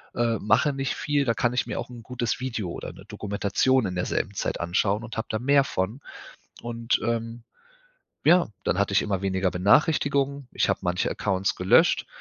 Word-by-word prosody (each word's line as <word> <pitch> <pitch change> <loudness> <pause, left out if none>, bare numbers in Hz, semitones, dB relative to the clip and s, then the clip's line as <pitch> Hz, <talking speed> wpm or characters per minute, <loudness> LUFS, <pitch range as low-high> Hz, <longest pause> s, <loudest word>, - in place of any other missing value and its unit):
äh, 115 -2 +1
mache 140 +7 +2
nicht 135 -1 -2
viel, 145 -1 0
da 115 - +2
kann 120 -2 +1
ich 125 - 0
mir - - -3
auch - - -6
'n 120 -2 -10
gutes 120 -2 -3
Video 115 -9 -3
oder - - -6
'ne - - -14
Dokumentation 105 +5 0
in 90 - -3
derselben 90 +2 -2
Zeit - - -3
anschauen 100 +5 0
und 120 - -8
habe 110 - -3
da 110 - -1
mehr 140 +3 +4
von. 110 +1 -3 0.6
Und, 115 0 -1
ähm, 115 0 -2 0.8
ja, 175 +2 +5 0.2
dann 90 - 0
hatte 100 0 +1
ich - - +4
immer 100 -2 -2
weniger 95 -1 0
Benachrichtigungen. 140 - +2
Ich - - +1
habe - - 0
manche 90 +1 0
Accounts 95 -1 -1
gelöscht 90 +1 +4
115 Hz, 185 wpm, -25 LUFS, 100-130 Hz, 0.8 s, ja